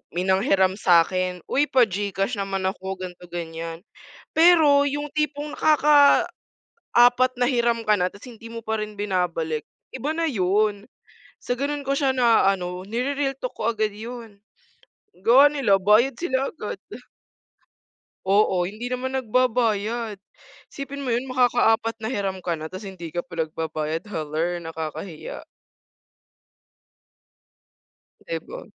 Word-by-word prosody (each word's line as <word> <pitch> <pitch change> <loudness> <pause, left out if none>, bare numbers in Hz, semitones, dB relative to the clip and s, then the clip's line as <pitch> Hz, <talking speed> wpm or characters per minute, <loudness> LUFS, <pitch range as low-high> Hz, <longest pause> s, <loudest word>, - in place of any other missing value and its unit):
may 180 - 0
nanghiram 190 0 +2
sa'kin 180 0 +2
"Uy 290 +2 +1
pa 260 -2 +4
Gcash 200 +1 -2
naman 195 -1 -2
ako" 190 0 -3
ganito 180 -1 -9
ganiyan, 165 0 -6 0.5
pero 320 -4 +6
'yung 290 +1 -2
tipong 300 0 -2
nakakaapat 295 -2 +4 0.9
na 245 0 +1
hiram 235 -2 +1
ka 210 -2 +2
na 180 - +2
ta's 200 +2 -9
hindi 230 0 -13
mo 230 0 -8
pa 220 0 -2
rin 215 0 -5
binabalik, 175 -6 -2 0.2
iba 285 +5 -3
na 330 -2 0
'yun. 205 0 0 0.5
Sa 245 - -3
ganun 285 +2 -3
ko 275 - 0
siya 270 -2 +1
naaano, 195 -6 +2
niri-real 270 +3 -1
talk 255 - -5
ko 225 - -1
agad 215 -2 -1
'yun. 225 -2 -9 0.8
Gawa 270 +5 +7
nila, 235 -10 +2
bayad 215 +7 +4
sila 265 -3 -1
agad. 210 -9 -6 1.5
Oo, 190 -2 +3
hindi 215 +6 -5
naman 255 +1 -3
nagbabayad. 230 -3 0 0.6
Isipin 280 0 -6
mo 250 - -2
'yun 250 +3 -1
makakaapat 235 -2 +2
na 220 - -3
hiram 195 -6 -2
ka 170 -2 -2
na 155 0 -7
ta's 190 +2 -8
hindi 170 -4 -8
ka 175 - -1
pa 165 -2 -3
nagbabayad, 155 +2 -4
haller 165 0 -2
nakakahiya. 160 +1 -7 2.8
'Di - - -3
ba. - - -9
215 Hz, 130 wpm, -24 LUFS, 185-255 Hz, 2.8 s, Gawa